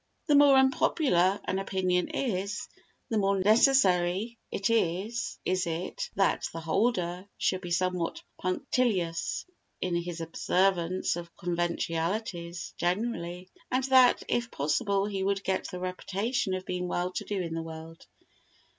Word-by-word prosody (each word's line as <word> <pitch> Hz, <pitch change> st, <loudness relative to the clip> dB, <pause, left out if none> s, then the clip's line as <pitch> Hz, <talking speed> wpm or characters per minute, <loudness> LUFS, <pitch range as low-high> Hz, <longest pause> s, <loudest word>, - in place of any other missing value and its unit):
The 300 Hz, -, +2 dB
more 285 Hz, -1 st, +7 dB
unpopular 260 Hz, -, +3 dB
an 190 Hz, -, -1 dB
opinion 185 Hz, -2 st, 0 dB
is, 205 Hz, -5 st, -2 dB, 0.4 s
the 220 Hz, -, +1 dB
more 195 Hz, 0 st, +2 dB
necessary 210 Hz, -1 st, +3 dB
is 210 Hz, +2 st, 0 dB, 0.4 s
it 170 Hz, +2 st, -3 dB
that 195 Hz, 0 st, +1 dB
the 165 Hz, -, -6 dB
holder 180 Hz, +1 st, 0 dB
should 185 Hz, -, 0 dB
be 175 Hz, -, -6 dB
somewhat 180 Hz, -, -1 dB, 0.2 s
punctilious 185 Hz, -, 0 dB, 0.3 s
in 180 Hz, -, -2 dB
his 170 Hz, -1 st, -3 dB
observance 180 Hz, +2 st, +1 dB
of 170 Hz, -1 st, -8 dB
conventionalities 175 Hz, +1 st, -2 dB
generally, 180 Hz, -2 st, -2 dB, 0.2 s
and 255 Hz, +1 st, +1 dB
that, 260 Hz, -1 st, +5 dB
if 240 Hz, 0 st, 0 dB
possible, 195 Hz, -, 0 dB
he 200 Hz, -2 st, -3 dB
should 195 Hz, 0 st, 0 dB
get 190 Hz, -1 st, -1 dB
the 180 Hz, -, -6 dB
reputation 190 Hz, +3 st, -2 dB
of 185 Hz, 0 st, -5 dB
being 180 Hz, 0 st, -2 dB
well 180 Hz, +1 st, -1 dB
to -, -, -4 dB
do 205 Hz, -2 st, -3 dB
in 170 Hz, -3 st, -3 dB
the 165 Hz, -, -2 dB
world. 160 Hz, 0 st, -9 dB
185 Hz, 130 wpm, -29 LUFS, 175-215 Hz, 0.4 s, more